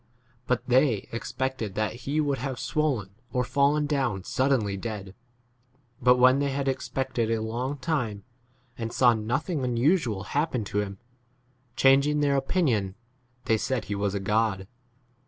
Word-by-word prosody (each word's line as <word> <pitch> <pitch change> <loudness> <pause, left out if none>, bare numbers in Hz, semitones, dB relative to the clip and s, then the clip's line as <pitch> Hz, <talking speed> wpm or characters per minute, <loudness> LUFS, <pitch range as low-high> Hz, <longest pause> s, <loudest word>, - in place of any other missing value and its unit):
But 125 -1 +1
they 125 -4 +3
expected 120 -3 -3
that 110 0 -1 0.2
he 150 +2 +1
would 145 -3 0
have 130 -3 -4
swollen 135 -11 -1 0.2
or 125 - +1
fallen 145 +3 +2
down 135 -10 -1
suddenly 130 -5 +1
dead. 100 -2 -6 0.9
But 125 +1 +5
when 130 +2 +5
they 140 0 +1
had 140 0 -2
expected 130 -3 -1
a 115 -1 +1
long 120 +6 -3
time 125 -8 -2 0.6
and 115 0 -3
saw 120 -2 +5
nothing 125 - -2
unusual 125 - +1
happen 140 -1 -1
to 105 0 -2
him, 100 -1 -5 0.8
changing 140 +3 +4
their 140 -1 +2
opinion, 135 - 0 0.5
they 110 - +3
said 125 +1 -2
he 105 - -3
was 100 0 -1
a - - 0
god. 105 -1 0
125 Hz, 145 wpm, -27 LUFS, 110-140 Hz, 0.9 s, But